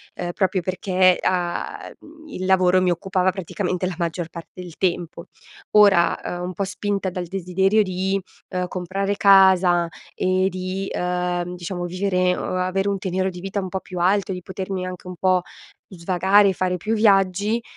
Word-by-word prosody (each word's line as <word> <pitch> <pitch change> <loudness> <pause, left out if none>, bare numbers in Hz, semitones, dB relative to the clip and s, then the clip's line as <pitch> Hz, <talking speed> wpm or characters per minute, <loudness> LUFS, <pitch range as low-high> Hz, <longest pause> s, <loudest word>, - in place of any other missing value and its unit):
ehm, 175 -1 -4
proprio 190 -1 0
perché 185 0 +2
a 175 -2 -2
mhmm, 315 0 -16
il 185 -7 -5
lavoro 185 -1 +4
mi 180 -1 +2
occupava 185 +1 0
praticamente 185 0 -3
la 180 - -4
maggior 170 -1 -3
parte 170 +2 -10
del 175 -3 -10
tempo. 175 -3 -2 0.5
Ora, 200 -5 +5
uhm, 175 0 -4
un 180 +1 -4
po' 200 - -2
spinta 200 0 -2
dal 180 0 -4
desiderio 190 +3 +1
di, 190 +1 -1 0.3
ehm, 180 0 -2
comprare 195 +3 -2
casa 190 -3 +5 0.3
e 185 0 +1
di, 185 +1 -4
uhm, 180 0 -2
diciamo, 175 0 -5
vivere 185 0 0
o - - -3
avere 185 +2 0
un 200 - -1
tenero 190 0 -1
di 180 - -9
vita 195 +1 -3
un 185 - -5
po' 190 - -3
più 180 -1 -7
alto 195 +2 +2
e - - -2
di 180 - -7
potermi 190 0 -4
anche 180 0 -8
un 180 - -7
po' 185 -1 +2 0.5
svagare, 190 +2 +3
fare 180 0 -1
più 215 +6 -2
viaggi, 205 +1 +2
185 Hz, 170 wpm, -22 LUFS, 180-195 Hz, 0.5 s, Ora